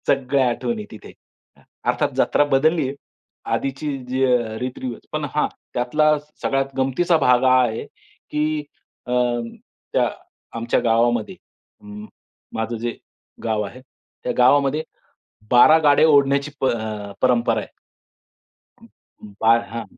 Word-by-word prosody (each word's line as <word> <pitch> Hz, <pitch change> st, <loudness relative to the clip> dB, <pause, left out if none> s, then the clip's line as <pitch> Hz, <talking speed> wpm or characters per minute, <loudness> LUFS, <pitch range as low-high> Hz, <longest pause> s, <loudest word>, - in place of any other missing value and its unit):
सगळ्या 135 Hz, -1 st, +2 dB
आठवणी 215 Hz, -, -3 dB
तिथे. 110 Hz, -, -11 dB, 0.5 s
अ, -, -, -23 dB, 0.3 s
अर्थात -, -, +1 dB
जत्रा -, -, +3 dB
बदलली 155 Hz, +2 st, +3 dB
आहे. 135 Hz, -, -5 dB, 0.6 s
आधीची 140 Hz, +1 st, -2 dB
जी 130 Hz, +1 st, 0 dB
अ, 120 Hz, -3 st, +1 dB
रीतरिवाज 125 Hz, -1 st, -5 dB
पण -, -, -2 dB
हा -, -, +2 dB, 0.3 s
त्यातला 150 Hz, +5 st, +2 dB, 0.2 s
सगळ्यात 135 Hz, -1 st, -1 dB
गमतीचा 135 Hz, +6 st, +2 dB
भाग 125 Hz, -3 st, +3 dB
हा 130 Hz, 0 st, +5 dB
आहे, 115 Hz, -2 st, -2 dB
की 150 Hz, 0 st, -4 dB, 0.4 s
अ, -, -, -4 dB, 0.8 s
त्या -, -, +2 dB, 0.5 s
आमच्या 115 Hz, +1 st, 0 dB
गावामध्ये, 115 Hz, 0 st, +1 dB, 0.5 s
म 105 Hz, 0 st, -10 dB, 0.5 s
माझं 110 Hz, +1 st, -3 dB
जे 120 Hz, +1 st, -4 dB, 0.5 s
गाव 110 Hz, -2 st, 0 dB
आहे, 110 Hz, +6 st, -9 dB, 0.4 s
त्या 125 Hz, -, -1 dB
गावामध्ये 140 Hz, +4 st, +3 dB, 0.7 s
12 125 Hz, +6 st, +7 dB
गाड्या 150 Hz, 0 st, +5 dB
ओढण्याची 140 Hz, -1 st, +3 dB
प -, -, -1 dB, 0.6 s
परंपरा 120 Hz, -3 st, +2 dB
आहे. -, -, -9 dB, 1.7 s
बा 115 Hz, +1 st, +6 dB, 0.2 s
हां, 115 Hz, 0 st, -4 dB
130 Hz, 120 wpm, -21 LUFS, 120-145 Hz, 1.7 s, 12